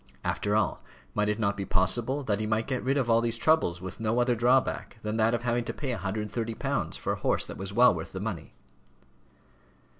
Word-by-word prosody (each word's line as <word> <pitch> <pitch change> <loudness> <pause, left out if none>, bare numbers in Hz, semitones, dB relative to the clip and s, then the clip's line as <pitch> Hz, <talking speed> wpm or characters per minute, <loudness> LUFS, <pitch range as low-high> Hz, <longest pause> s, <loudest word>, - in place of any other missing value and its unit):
After 105 +1 0
all, 110 - +1 0.3
might 105 0 +1
it 105 - 0
not 100 -3 0
be 100 - -3
possible 115 +10 +1
that 105 -5 0
he 110 - -2
might 110 +1 0
get 130 -2 -2
rid 135 +2 +1
of 130 -4 +1
all 115 0 +4
these 115 0 0
troubles 115 - +2
with 95 +3 -7
no 110 +2 0
other 120 0 +3
drawback 120 +1 +1
than 105 +1 -2
that 115 +1 +3
of 120 - -4
having 120 0 +1
to - - -4
pay 135 -4 -2
£130 110 +2 -2
for - - -2
a - - -6
horse - - +1
that - - -8
was 95 0 -4
well 120 0 +6
worth 80 -2 -6
the 95 - -5
money? 100 -5 -5
110 Hz, 215 wpm, -28 LUFS, 100-120 Hz, 0.3 s, well